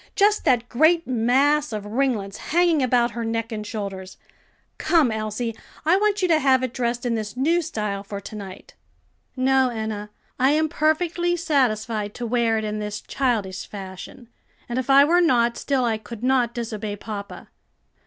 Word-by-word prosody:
just 415 +1 +3
that 240 -2 +2
great 315 +7 +3
mass 265 +5 +2
of 210 -2 -4
ringlets 215 -4 -1
hanging 340 -2 +2
about 245 -2 +2
her 235 0 -4
neck 225 0 -2
and 210 -1 -5
shoulders. 195 -3 -6 0.6
Come, 315 -8 +3
Elsie, 220 +1 -3 0.3
I 330 +3 +5
want 410 -1 +1
you - - +4
to 320 -2 +4
have 265 -2 +3
it 255 -2 -3
dressed 240 -1 -2
in 240 - 0
this 220 +1 -4
new 330 +6 +2
style 210 -10 -3
for 200 0 -6
to 200 +2 -9
night." 195 -2 -9 0.6
"No, 260 0 +3
Enna, 220 -3 -4 0.3
I 265 +3 +4
am 310 +1 +1
perfectly 345 +3 +1
satisfied 230 -10 0
to 245 - -4
wear 230 -1 +1
it 220 - -2
in 215 0 -3
this 210 0 -4
childish 220 -8 -2
fashion; 195 +4 -9 0.4
and 240 +1 -2
if 260 - -4
I 275 +1 +8
were 350 +4 +4
not, 240 -7 +3
still 265 -1 0
I 225 -2 0
could 230 +1 -10
not 250 -2 +2
disobey 220 -3 -4
papa." 205 0 -8
240 Hz, 175 wpm, -23 LUFS, 215-280 Hz, 0.6 s, I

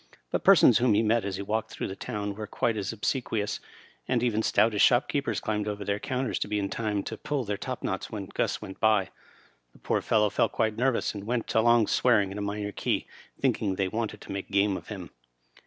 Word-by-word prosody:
But - - -1
persons 155 - +7
whom 120 -4 +3
he 110 - +3
met 115 +1 +2
as 100 -1 -2
he 100 - -4
walked 110 +2 -2
through - - -4
the 95 - -6
town 105 +1 -4
were 105 +1 -6
quite 115 +2 0
as 100 -3 -2
obsequious, 110 -2 -2 0.5
and - - +1
even 110 -3 +1
stoutish 105 -1 +2
shop 125 +3 +4
men 140 0 0
climbed 105 -1 -2
over 105 -1 -4
their 100 +1 -1
counters 130 0 -2
to - - -2
be 105 0 -1
in 100 -1 -2
time 105 -3 -1
to 110 - -5
pull 145 -3 -2
their 105 -2 -2
top 130 +4 -5
knots 95 -1 -3
when 105 -3 -5
Gus - - -2
went 95 - -9
by. 110 -4 +3 0.6
The - - -19
poor - - -1
fellow 105 -2 +2
felt - - +1
quite 110 -2 0
nervous, 125 +1 +1
and 100 -1 -7
went 120 -1 -1
along 115 0 +5
swearing 105 -4 +3
in 100 - -5
a - - -3
minor 100 0 -3
key, - - -1 0.3
thinking 100 -3 +1
they 95 0 0
wanted 110 0 -3
to - - -9
make 100 0 -5
game 100 0 +2
of - - -8
him. 95 -6 -7
105 Hz, 225 wpm, -28 LUFS, 100-115 Hz, 0.6 s, persons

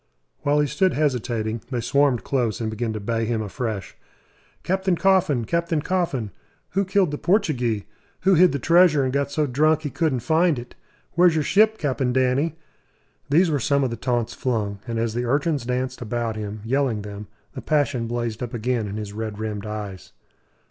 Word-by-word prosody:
While 145 +1 +2
he - - +2
stood 185 +6 +1
hesitating, 120 -6 -1
they 125 -3 -2
swarmed 135 +1 +2
close 120 -6 0
and 110 -2 -2
began 115 +1 -2
to 110 - -4
bay 115 +2 -1
him 110 -1 -1
afresh. 110 -2 -4 0.7
"Captain 190 0 +1
Coffin, 180 -10 +2
Captain 170 +3 0
Coffin!" 145 - -1 0.4
"Who 195 +1 0
killed 190 -3 +2
the 150 - -4
Portugee?" 125 - +1 0.4
"Who 195 - +4
hid 180 +1 +6
the 140 - -1
treasure 165 0 +4
and 130 0 -1
got 140 0 0
so 150 +1 0
drunk 155 +4 +2
he 145 - -3
couldn't 150 -7 0
find 160 +2 +2
it?" 120 0 -8 0.4
"Where's 175 -1 +4
your 155 - +1
ship, 215 +6 +4
Cap'n 130 -5 -1
Danny?" 130 +5 +1 0.7
These 165 +4 +4
were 145 - +1
some 140 +2 +2
of 130 - 0
the - - -2
taunts 120 -1 -1
flung; 105 -5 -2
and 115 -1 -3
as 115 -1 -1
the 120 +1 -1
urchins 140 0 0
danced 130 +1 -2
about 115 -1 -2
him, 105 0 -5
yelling 125 -4 0
them, 105 0 -8 0.3
the 130 - -6
passion 140 -6 0
blazed 120 -1 -3
up 120 0 -4
again 120 -1 -1
in 100 +1 -5
his 105 -2 -6
red 110 -1 -4
rimmed 105 -1 -4
eyes. 105 -3 -7
130 Hz, 185 wpm, -23 LUFS, 115-155 Hz, 0.7 s, hid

